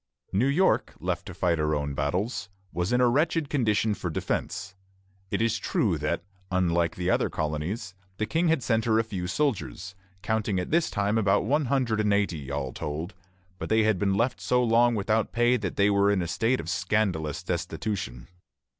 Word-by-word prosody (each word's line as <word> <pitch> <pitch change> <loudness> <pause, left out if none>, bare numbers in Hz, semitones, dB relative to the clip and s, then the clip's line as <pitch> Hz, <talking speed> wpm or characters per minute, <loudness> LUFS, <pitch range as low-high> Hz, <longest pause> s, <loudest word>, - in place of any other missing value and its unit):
New 110 +8 +3
York, 170 +8 +2
left - - -3
to - - -7
fight 85 -3 +1
her 75 0 +1
own 70 -1 -2
battles, 100 - -2 0.2
was 90 +4 -1
in 125 - +3
a 125 - +5
wretched 155 +4 +1
condition 110 -5 +2
for 90 -3 -4
defence. 95 +4 -3 0.6
It - - 0
is 115 -1 +1
true 90 -9 0
that, 75 +3 -1 0.3
unlike 85 -3 +1
the 90 +1 0
other - - +2
colonies, 80 +7 -3 0.2
the 110 - 0
King 160 +9 +1
had 160 -5 +2
sent 115 -2 +1
her 110 -1 +3
a 115 - +3
few 95 -5 -4
soldiers, 95 - -2 0.3
counting 110 -3 0
at 90 - -4
this 165 +1 +2
time 105 +2 +1
about 100 -1 +2
one 145 +5 +2
hundred 125 -4 +1
and 105 -1 +3
eighty, 85 -9 -1
all 70 -3 -3
told; 80 +6 -4 0.5
but - - -5
they 110 0 +4
had 110 -4 +2
been 100 0 +1
left 115 +5 0
so 125 0 +2
long 120 0 +4
without 110 +1 0
pay 120 +1 +3
that 105 -7 -3
they 100 +1 +3
were 100 0 +3
in 100 -3 +2
a - - -3
state 115 +9 +1
of - - -6
scandalous 90 -5 0
destitution. 90 - -3
105 Hz, 190 wpm, -27 LUFS, 90-115 Hz, 0.6 s, a